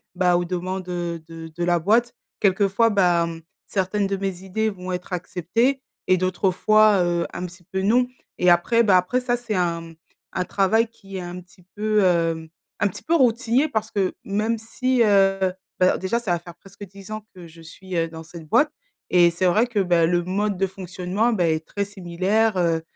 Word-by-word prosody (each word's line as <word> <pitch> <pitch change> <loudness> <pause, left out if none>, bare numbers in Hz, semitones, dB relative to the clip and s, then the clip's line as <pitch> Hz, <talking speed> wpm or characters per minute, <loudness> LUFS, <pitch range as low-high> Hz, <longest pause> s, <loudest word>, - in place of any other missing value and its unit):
bah, 180 -1 +3
aux 175 - -1
demandes, 185 +1 -4
heu, 175 -1 -3
de 165 0 -9
de 175 - -3
la 175 0 +3
boîte. 220 +8 +2 0.3
Quelquefois 200 +3 +3
bah, 175 -5 +3
mmh, 165 0 -7 0.3
certaines 195 +1 0
de 195 0 -2
mes 190 -2 -4
idées 215 +3 -1
vont 185 -2 -7
être 180 +1 -5
acceptées 190 +10 0 0.3
et 185 0 +4
d'autres 185 +1 0
fois, 215 +1 +4
heu, 175 -1 0
un 180 - -5
petit 180 0 -12
peu 190 0 -1
non. 245 +5 +3 0.3
Et 180 - +4
après 205 +7 +4
bah, 200 -5 +5
après 180 +8 0
ça, 245 -1 0
c'est 235 -3 -5
un, 170 -3 0
mmh, 165 0 -12 0.4
un 180 - -1
travail 210 +5 +2
qui 195 -4 -11
est - - -4
un 175 0 -7
petit 180 +1 -22
peu, 215 0 +1
hem, 165 -3 +1 0.3
un 205 - +3
petit 190 - -8
peu 330 - 0
routinier 255 -1 +3
parce 220 -3 -2
que 195 -3 0
même 215 +3 -1
si, 245 +3 0
heu 195 -3 +3 0.3
bah, 185 - +3
déjà 190 +5 -1
ça 220 -7 -3
va 175 - +1
faire 170 0 -12
presque 195 +1 -14
10 195 +2 -13
ans 215 0 -5
que 180 - -11
je 165 0 -15
suis, 185 +3 -9
heu, 165 -1 +1
dans 160 0 -9
cette 165 -1 -12
boîte. 295 - +3 0.4
Et 175 -1 +6
c'est 175 +2 -2
vrai 215 +7 +3
que, 235 - -6
bah, 175 -3 +3
le 175 0 +1
mode 200 +2 -1
de 195 - +1
fonctionnement, 190 +4 -2
beh, 175 -7 +2
est 155 - -1
très 200 0 -2
similaire, 195 +3 0
heu, 165 -2 +1
185 Hz, 210 wpm, -23 LUFS, 175-215 Hz, 0.4 s, Et